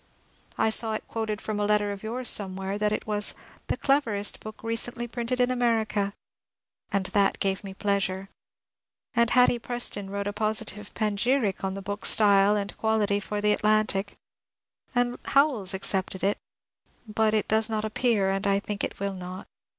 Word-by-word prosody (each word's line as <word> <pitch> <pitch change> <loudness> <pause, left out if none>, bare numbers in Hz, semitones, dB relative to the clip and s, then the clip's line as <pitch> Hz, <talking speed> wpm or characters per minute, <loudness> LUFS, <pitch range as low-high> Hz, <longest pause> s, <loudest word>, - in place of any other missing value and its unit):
I 220 - +2
saw 220 0 +2
it - - -6
quoted 220 -2 -3
from 215 -1 -3
a 205 - +1
letter 210 -1 +2
of 200 -1 -7
yours 240 +3 -3
somewhere 195 0 +1
that 210 0 +1
it 215 - -2
was 210 -1 +2
^^ - - -22 0.3
the - - -1
cleverest 230 -8 0
book 215 0 -10
recently 235 +1 0
printed 240 +1 -3
in 250 0 +3
America," 220 -5 0 0.8
and 200 -1 0
that 200 -2 +2
gave 195 0 -1
me 195 -1 -8
pleasure. 195 -1 -1 0.9
And 235 -2 +3
Hatty 250 -1 +4
Preston 230 -4 -2
wrote 200 0 -3
a 205 - -2
positive 210 -1 -1
panegyric 215 0 0
on 190 0 -2
the 195 - -7
book's 205 +1 0
style 205 -1 +5
and 205 -1 -3
quality 215 -2 +1
for 205 +1 -4
the 210 - +2
^^ - - +5
Atlantic," 215 -2 +1 0.8
and 245 0 +1
Howells 275 -9 +2
accepted 190 -1 0
it, 200 +1 +1 0.4
— - - -66 0.2
but 215 0 +1
it 215 - 0
does 220 +1 +2
not 215 -1 -1
appear, 215 -3 +1
and 195 +1 -1
I 200 0 +3
think 205 0 -5 0.2
will 200 0 -2
not. 185 0 -7
210 Hz, 175 wpm, -26 LUFS, 200-225 Hz, 0.9 s, style